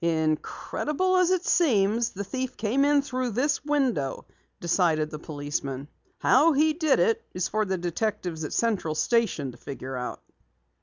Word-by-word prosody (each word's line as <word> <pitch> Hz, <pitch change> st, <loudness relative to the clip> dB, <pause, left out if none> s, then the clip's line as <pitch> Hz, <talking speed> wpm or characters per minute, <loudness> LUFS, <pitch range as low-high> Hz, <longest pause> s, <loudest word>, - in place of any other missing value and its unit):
"Incredible 170 Hz, -, 0 dB
as 365 Hz, -1 st, +4 dB
it 370 Hz, -1 st, +1 dB
seems, 230 Hz, -, +3 dB
the 200 Hz, -, -4 dB
thief 255 Hz, +5 st, -4 dB
came 275 Hz, +6 st, +2 dB
through 255 Hz, -2 st, -2 dB
this 275 Hz, +6 st, 0 dB
window," 265 Hz, -, 0 dB, 0.3 s
decided 165 Hz, -3 st, +1 dB
the 150 Hz, -, -6 dB
policeman. 145 Hz, -2 st, -4 dB, 0.3 s
"How 305 Hz, +5 st, +4 dB
he 310 Hz, +2 st, +3 dB
did 315 Hz, -2 st, +2 dB
it 200 Hz, +6 st, +2 dB
is 180 Hz, 0 st, 0 dB
for 215 Hz, 0 st, 0 dB
the 190 Hz, -1 st, -1 dB
detectives 175 Hz, -2 st, -2 dB
at 150 Hz, -, -4 dB
Central 205 Hz, -9 st, 0 dB
Station 190 Hz, -, +1 dB
to 120 Hz, -, -15 dB
figure 135 Hz, -2 st, -7 dB
out." 125 Hz, -1 st, -5 dB
210 Hz, 150 wpm, -26 LUFS, -, 0.3 s, as